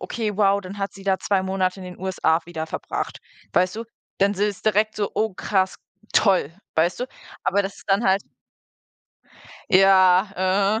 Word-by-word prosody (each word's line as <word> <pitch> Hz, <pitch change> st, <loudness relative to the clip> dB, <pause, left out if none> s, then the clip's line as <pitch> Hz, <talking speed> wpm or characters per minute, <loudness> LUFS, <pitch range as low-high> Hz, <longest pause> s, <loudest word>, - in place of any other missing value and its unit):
„Okay, 215 Hz, -4 st, -3 dB
wow, 200 Hz, -1 st, +3 dB
dann 195 Hz, +1 st, -9 dB
hat 195 Hz, 0 st, -3 dB
sie 195 Hz, 0 st, -13 dB
da 190 Hz, -1 st, +1 dB
2 195 Hz, -2 st, 0 dB
Monate 190 Hz, 0 st, -1 dB
in -, -, -8 dB
den 180 Hz, -1 st, -9 dB
USA 180 Hz, -3 st, +1 dB
wieder 160 Hz, -2 st, -5 dB
verbracht.“ -, -, -4 dB, 0.3 s
Weißt 185 Hz, +3 st, +2 dB
du? 230 Hz, -, -4 dB, 0.3 s
Dann 200 Hz, +1 st, +3 dB
s 200 Hz, -, -7 dB
ist 205 Hz, -1 st, +1 dB
es -, -, -19 dB
direkt 215 Hz, 0 st, +2 dB
so: 205 Hz, -1 st, -1 dB
„Oh 220 Hz, -2 st, 0 dB
krass, 190 Hz, -1 st, 0 dB, 0.4 s
toll“, 185 Hz, -7 st, +3 dB, 0.2 s
weißt 170 Hz, +6 st, +1 dB
du? 250 Hz, -, -1 dB, 0.4 s
Aber 200 Hz, +2 st, +2 dB
das 195 Hz, 0 st, -6 dB
ist -, -, -15 dB
dann 195 Hz, +4 st, +2 dB
halt 190 Hz, +1 st, +3 dB, 1.5 s
Ja. 195 Hz, +2 st, +4 dB
195 Hz, 180 wpm, -23 LUFS, 185-205 Hz, 1.5 s, Ja